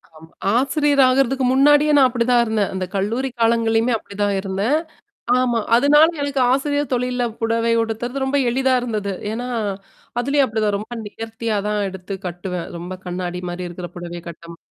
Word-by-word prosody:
ஆமா. 160 +1 -14 0.3
ஆசிரியர் 280 +2 +2
ஆகுறதுக்கு 265 0 +2
முன்னாடியே 290 +2 +5
நான் 270 -2 +7
அப்படிதான் 240 0 +2
இருந்தேன். 220 -3 0
அந்த 190 -1 -2
கல்லூரி 230 +7 -1
காலங்கள்லயுமே 230 +1 +2
அப்படிதான் 205 -1 -2
இருந்தேன். 195 +7 0 0.6
ஆமா. 245 -2 +1 0.2
அதனால 290 +5 +6
எனக்கு 280 -2 0
ஆசிரியர் 285 +2 0
தொழில்ல 250 0 0
புடவை 230 0 +1
உடுத்துறது 240 +4 -3
ரொம்ப 275 +1 +1
எளிதா 265 +1 +2
இருந்தது. 210 -5 -3 0.2
ஏன்னா, 240 +3 -4 0.7
அதுலயும் 280 +2 +2
அப்படிதான் 215 -3 0
ரொம்ப 215 +3 -10
நேர்த்தியா 225 +1 -4
தான் 210 0 0
எடுத்து 190 +1 -7
கட்டுவேன். 175 0 -5
ரொம்ப 175 +2 -6
கண்ணாடி 180 0 -4
மாரி 175 +1 -5
இருக்கிற 175 +1 -7
புடவை 175 0 -7
கட்டம் 170 0 -11
230 Hz, 145 wpm, -20 LUFS, 195-260 Hz, 0.7 s, நான்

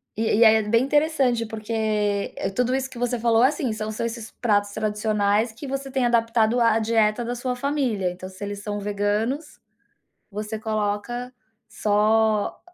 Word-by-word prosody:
E 225 - -1
e 230 - +6
aí, 220 0 +7
é 220 - +3
bem 230 +3 +2
interessante, 275 -4 +2
porque, 220 0 -6 0.6
eh, - - -2
tudo 250 +5 0
isso 265 0 -1
que 250 -2 -10
você 245 0 0
falou 230 0 +3
é, - - +7
assim, 270 -5 -2
são 215 0 -4
são 215 +2 -3
esses 230 -1 -5
pratos 205 -3 0
tradicionais 210 +1 0
que 235 +6 -9
você 275 0 -4
tem 260 -1 0
adaptado 230 0 +2
à 230 -1 +4
dieta 225 0 +1
da 240 - -2
sua 250 +1 -3
família, 250 -8 -1
então 185 +1 -9
se 190 +1 -10
eles 205 0 -5
são 205 0 -4
veganos, 210 +8 -2 0.7
você 210 +2 -5
coloca 215 +3 -3 0.3
só, 215 0 +1
225 Hz, 175 wpm, -24 LUFS, 210-245 Hz, 0.7 s, aí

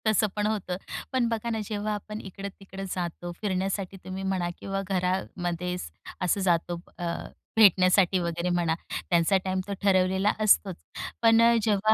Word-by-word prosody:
तसं 215 0 +4
पण 210 0 +1
होतं. 200 -4 -2 0.4
पण 255 -2 +2
बघा 230 0 -2
ना 225 -1 -1
जेव्हा 210 0 -2
आपण 210 +1 -6
इकडं-तिकडं 195 0 -8
जातो 175 -1 -4
फिरण्यासाठी 195 -1 -2
तुम्ही 190 +1 -5
म्हणा, 190 -2 0
किंवा 195 0 -3
घरामध्ये 180 -1 -1 0.5
असं 180 +2 +1
जातो 175 -1 +1 0.2
अ, 175 - -4 0.5
भेटण्यासाठी 185 -2 +6
वगैरे 170 0 -1
म्हणा. 170 -2 +1 0.3
त्यांचा 170 +2 +4
टाईम 185 0 0
तो 200 - -2
ठरवलेला 190 +1 +3
असतोच. 200 -3 +4 0.5
पण 225 0 +6
अ, 235 0 +6
जेव्हा 215 0 +3
190 Hz, 145 wpm, -27 LUFS, 180-210 Hz, 0.5 s, भेटण्यासाठी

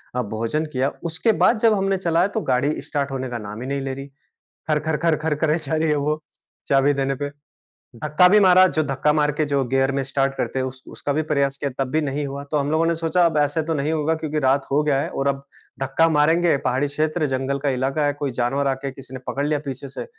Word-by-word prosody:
अ, 125 - +1
भोजन 115 +7 -2
किया, 130 +1 +1 0.2
उसके 200 +8 +2
बाद 230 - +3
जब 225 -1 +4
हमने 195 -1 +1
चलाया 175 0 +2
तो - - +1
गाड़ी 140 +4 +1
स्टार्ट 140 -2 -3
होने 130 -1 -3
का 120 - -4
नाम 105 +3 -7
ही 130 - -5
नहीं 140 0 -2
ले 135 0 -3
रही। 135 +1 -7 0.6
खर-खर-खर-खर 155 0 +1
करे 155 +1 +1
जा 155 -1 -2
रही 160 +1 +1
है 150 - +2
वो 150 +2 -1 0.5
चाबी 140 +1 +3
देने 135 0 0
पे। 145 +2 -4 0.7
धक्का 150 +7 +4
भी 210 +3 +6
मारा, 185 -1 +7
जो 155 -3 0
धक्का 140 +1 +1
मार 150 -1 +2
के 150 +1 -1
जो 140 -2 +1
गियर 135 +2 +1
में 135 0 -1
स्टार्ट 135 0 0
करते 135 - -2
हैं 130 - 0
उस 130 0 -7
उसका 145 - -2
भी 155 - +1
प्रयास 140 -1 +1
किया 140 - -2
तब 130 - -7
भी 155 - +1
नहीं 145 0 -2
हुआ। 140 +1 -6
तो 150 - +2
हम 145 0 -1
लोगों 160 +1 +2
ने 170 0 +1
सोचा 165 +2 +2
अब 160 -2 +1
ऐसे 145 +2 +2
तो - - +2
नहीं 150 0 -1
होगा 160 +1 +1
क्योंकि 155 -1 -3
रात 135 0 +2
हो 145 +2 +3
गया 145 -3 +2
है - - -3
और 135 - -2
अब 140 0 -1 0.4
धक्का 135 +5 +2
मारेंगे 160 +2 +3
पहाड़ी 130 +3 +1
क्षेत्र 155 +3 -1
जंगल 135 +1 -2
का 140 +1 0
इलाका 135 +3 0
है, 145 - +1
कोई 145 -1 -3
जानवर 125 +4 0
आके 135 0 -2
किसी 135 -1 -13
ने - - -6
पकड़ 140 +1 -1
लिया 150 0 0
पीछे 135 0 -5
से, 135 - -7
145 Hz, 245 wpm, -22 LUFS, 135-155 Hz, 0.7 s, मारा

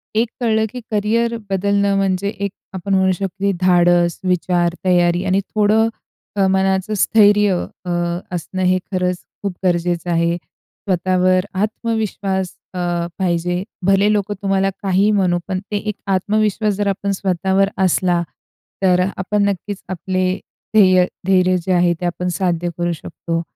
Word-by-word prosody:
एक 230 +2 +2
कळलं, 220 -2 +2
की 250 - -6
करिअर 225 +3 +1
बदलणं 200 +1 +1
म्हणजे 195 0 0
एक 200 -1 -4 0.2
आपण 190 +1 -3
म्हणू 190 0 +3
शकतो 195 +1 -1
धाडस, 175 -1 +3
विचार, 175 -1 +1
तयारी 175 -1 +3
आणि 190 +1 +2 0.2
थोडं 215 +1 +4 0.5
अ, 195 -1 +3
मनाचं 190 +1 +1
स्थैर्य 205 -2 +4 0.2
अ, - - -4 0.5
असणं 185 +2 -3
हे 185 0 +3
खरंच 180 -1 -1 0.2
खूप 200 -2 -2
गरजेचं 175 -1 0
आहे. 170 0 +2
स्वतःवर 185 0 -1 0.2
आत्मविश्वास 210 -4 -2 0.2
अ, 180 - -4 0.4
पाहिजे. 175 0 0 0.2
भले 195 +2 +4
लोकं 205 0 0
तुम्हाला 195 -1 +1
काहीही 195 +2 +3
म्हणू 185 -4 +2
पण 185 -1 -2
ते 205 - 0
एक 210 0 -3 0.2
आत्मविश्वास 210 +2 0
जर 205 +1 -1
आपण 200 0 -1
स्वतःवर 190 +1 +1 0.2
असला. 180 -1 +2 0.6
तर 180 -1 +4 0.2
आपण 200 +2 0
नक्कीच 200 0 -2
आपले 185 +1 -1 0.5
ध्येय 185 -4 +6 0.2
धैर्य 185 -1 +4
जे 190 - 0
आहे 175 -1 +3
ते - - -1
आपण 175 +1 -2
साध्य 175 -2 0
करू 175 0 0
शकतो. 165 +1 -4
190 Hz, 140 wpm, -19 LUFS, 180-200 Hz, 0.6 s, ध्येय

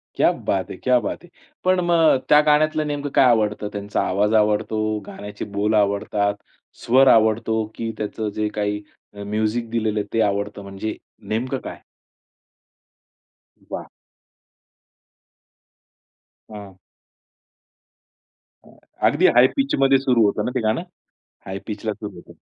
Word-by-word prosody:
क्या - - +4
बात - - -2
है, - - -6
क्या 125 -1 +2
बात 115 - -5
है! 175 - -16 0.3
पण 185 0 +3
मग 165 -5 +4
त्या 150 - +7
गाण्यातलं 155 0 +2
नेमकं 145 -1 -3
काय - - +6
आवडतं? 105 -3 +2
त्यांचा 100 0 -2
आवाज 105 +3 +1
आवडतो, 110 0 +1
गाण्याचे 105 0 -7
बोल 105 +2 +1
आवडतात, 100 0 +1 0.5
स्वर 130 +3 +5
आवडतो 110 -1 +3
की 115 -1 -3
त्याचं 105 0 -3
जे 105 0 0
काही 105 0 -1 0.3
अ, 100 0 -8
म्युझिक 110 +3 -2
दिलेलं 110 -2 -1
आहे 105 - -4
ते 115 - +2
आवडतं? 100 0 -1
म्हणजे 100 +2 -5 0.3
नेमकं 125 +5 -1
काय? - - -8 1.9
वा! - - -6 2.6
हां. 100 -3 -10 1.9
अ, - - -18 0.4
अगदी - - +3
हाय 125 +1 +7
पिचमध्ये 135 - +3
सुरू 125 -4 +3
होतं 105 +1 0
ना 125 - -2
ते 125 - +2
गाणं? 110 +7 0 0.7
हाय 95 0 -5
पिचला 110 0 -3
सुरू 105 0 -8
होतं. 85 - -13
110 Hz, 130 wpm, -22 LUFS, 105-125 Hz, 2.6 s, त्या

